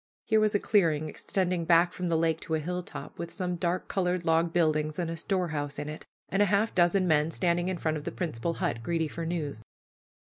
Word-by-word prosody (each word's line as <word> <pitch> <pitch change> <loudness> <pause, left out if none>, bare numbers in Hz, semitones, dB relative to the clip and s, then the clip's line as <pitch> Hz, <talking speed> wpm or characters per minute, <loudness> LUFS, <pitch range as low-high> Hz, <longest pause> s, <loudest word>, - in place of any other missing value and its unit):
Here 220 -1 +3
was 215 -1 +2
a - - +4
clearing 160 -8 +2
extending 180 +2 -1
back 170 +1 +4
from 180 -1 -3
the 165 - +2
lake 160 0 +1
to 160 - -2
a - - 0
hilltop, 180 +3 -6
with 170 - -4
some 180 0 -2
dark 175 +1 -1
colored 180 -2 0
log 165 +1 +3
buildings 155 -3 +1
and 170 -2 -1
a - - -3
storehouse 160 -5 -2
in 145 - -4
it, 150 +1 -7 0.2
and 195 - +1
half 205 +2 +3
a - - -25
dozen 180 +1 +3
men 155 -1 +3
standing 175 +1 0
in 185 - -2
front 155 -2 -1
of 150 - -7
the - - -4
principal 165 -2 -3
hut, 115 - -2
greedy 165 +5 0
for 165 +2 -5
news. 150 -8 -3
170 Hz, 220 wpm, -29 LUFS, 155-180 Hz, 0.2 s, a